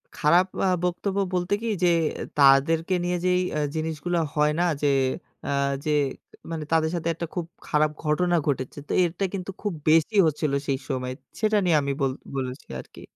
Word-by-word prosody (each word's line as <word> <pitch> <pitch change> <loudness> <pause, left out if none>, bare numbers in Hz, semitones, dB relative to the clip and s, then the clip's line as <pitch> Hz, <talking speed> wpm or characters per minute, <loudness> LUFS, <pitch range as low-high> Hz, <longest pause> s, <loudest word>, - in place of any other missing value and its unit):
খারাপ 170 +5 +4 0.2
আ - - +3 0.2
বক্তব্য 180 +2 -1 0.2
বলতে 180 +2 0
কি, 230 - -3 0.2
যে - - +5 0.5
তাদেরকে 150 +5 +5
নিয়ে 180 0 0
যেই 180 0 +3
অ্যা 150 - -1 0.2
জিনিসগুলো 160 +2 -2 0.2
হয় 150 0 +3
না - - +3 0.2
যে, 145 - +2 0.6
আ - - -2 0.4
যে 155 - +1 0.6
মানে 160 -2 -3
তাদের 160 -1 +3
সাথে 170 -1 -3
একটা 170 +1 -4
খুব 175 -2 -2 0.2
খারাপ 150 0 +2
ঘটনা 175 +3 +2
ঘটেছে। 130 -2 -2
তো - - -6
এরটা 175 +3 -1
কিন্তু 195 -1 -4
খুব 205 -3 -2 0.2
বেশি 165 +7 +4
হচ্ছিলো 150 -2 0
সেই 135 -1 0
সময়। 130 -2 -2 0.3
সেটা 215 -1 +2
নিয়ে 170 -3 +4
আমি 140 0 -1
বল 135 -1 +2 0.2
বলেছি 130 -1 -4
আরকি। - - -15
160 Hz, 175 wpm, -25 LUFS, 150-180 Hz, 0.6 s, যে